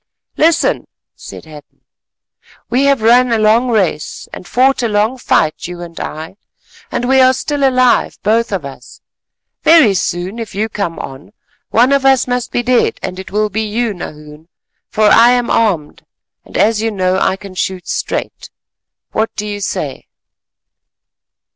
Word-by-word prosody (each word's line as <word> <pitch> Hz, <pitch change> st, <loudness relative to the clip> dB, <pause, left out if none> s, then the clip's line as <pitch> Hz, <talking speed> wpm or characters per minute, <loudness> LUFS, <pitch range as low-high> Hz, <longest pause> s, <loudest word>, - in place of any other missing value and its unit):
"Listen," 325 Hz, 0 st, +2 dB, 0.3 s
said -, -, -11 dB
Hadden. 150 Hz, -2 st, -15 dB, 0.9 s
"We 260 Hz, +3 st, +2 dB
have 275 Hz, -5 st, +2 dB
run 245 Hz, +2 st, +4 dB
a 230 Hz, -, +3 dB
long 220 Hz, +4 st, +3 dB
race 190 Hz, -9 st, -1 dB
and -, -, -9 dB
fought 260 Hz, +3 st, +2 dB
a 235 Hz, -, +1 dB
long 215 Hz, +3 st, +1 dB
fight, 155 Hz, -9 st, 0 dB
you 175 Hz, 0 st, -8 dB
and 170 Hz, -1 st, -10 dB
I, 160 Hz, +5 st, -7 dB, 0.5 s
and 245 Hz, -, -2 dB
we 265 Hz, 0 st, +4 dB
are 260 Hz, 0 st, +5 dB
still 285 Hz, +2 st, -2 dB
alive 255 Hz, -2 st, +2 dB
both 225 Hz, +2 st, +1 dB
of 185 Hz, -7 st, -3 dB
us. 140 Hz, -, -11 dB, 0.6 s
Very 315 Hz, -11 st, +6 dB
soon, 185 Hz, +3 st, -3 dB
if 225 Hz, -4 st, -7 dB
you 215 Hz, +2 st, -1 dB
come 200 Hz, -6 st, -3 dB
on, 135 Hz, +9 st, -9 dB, 0.4 s
one 245 Hz, +4 st, +3 dB
of 280 Hz, -1 st, +2 dB
us 270 Hz, -1 st, +4 dB
must 245 Hz, -1 st, -2 dB
be 240 Hz, -, -1 dB
dead, 250 Hz, 0 st, +1 dB
and 185 Hz, -, -5 dB
it 190 Hz, -, -8 dB
will 210 Hz, +1 st, -1 dB
be 220 Hz, +3 st, -1 dB
you, 220 Hz, +1 st, -1 dB
Nahoon, 150 Hz, -3 st, -10 dB, 0.4 s
for 215 Hz, -, -1 dB
I 230 Hz, +3 st, +6 dB
am 245 Hz, -1 st, 0 dB
armed 185 Hz, -10 st, 0 dB, 0.4 s
and -, -, -7 dB
as 215 Hz, 0 st, +2 dB
you 225 Hz, -, 0 dB
know 185 Hz, -2 st, 0 dB
I 190 Hz, -, +1 dB
can 195 Hz, -1 st, -11 dB
shoot 185 Hz, -2 st, -3 dB
straight. -, -, -4 dB, 0.6 s
What 220 Hz, +1 st, 0 dB
do 210 Hz, -, -4 dB
you 205 Hz, -1 st, -4 dB
say?" 150 Hz, -7 st, -4 dB
215 Hz, 165 wpm, -15 LUFS, 185-245 Hz, 0.9 s, Very